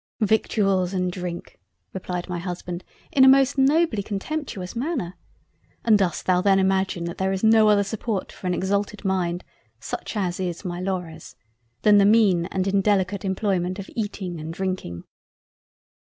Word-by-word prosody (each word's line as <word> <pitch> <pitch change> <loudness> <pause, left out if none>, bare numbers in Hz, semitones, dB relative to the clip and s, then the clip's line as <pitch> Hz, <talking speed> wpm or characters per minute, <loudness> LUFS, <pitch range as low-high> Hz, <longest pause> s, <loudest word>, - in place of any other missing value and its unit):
"Victuals 195 -3 +1
and 180 -1 0
Drink! 175 - -7 0.3
(replied 180 -1 -4
my 180 -2 -3
Husband 175 0 -5 0.3
in 265 - +5
a - - +8
most 270 +1 +5
nobly 280 -4 +3
contemptuous 205 -1 -5
Manner) 240 - -3 0.7
and 225 -2 +6
dost 190 -5 0
thou 180 -1 +3
then 195 0 +4
imagine 190 -2 +1
that 170 0 -5
there 190 0 +1
is 190 +1 -3
no 220 -1 +6
other 205 -1 +4
support 205 0 -3
for 185 - -7
an 180 - +1
exalted 200 +3 -2
mind 180 -2 -1 0.4
(such 215 - -5
as 180 -3 -1
is 180 0 -4
my 175 -1 -4
Laura's) 180 -3 -5 0.5
than 210 -1 +6
the 200 - +5
mean 200 -5 +4
and 190 -1 -2
indelicate 195 0 +1
employment 190 -2 -1
of 195 - -8
Eating 195 -6 -4
and 155 +1 -6
Drinking?" 185 - -4
190 Hz, 155 wpm, -24 LUFS, 180-210 Hz, 0.7 s, a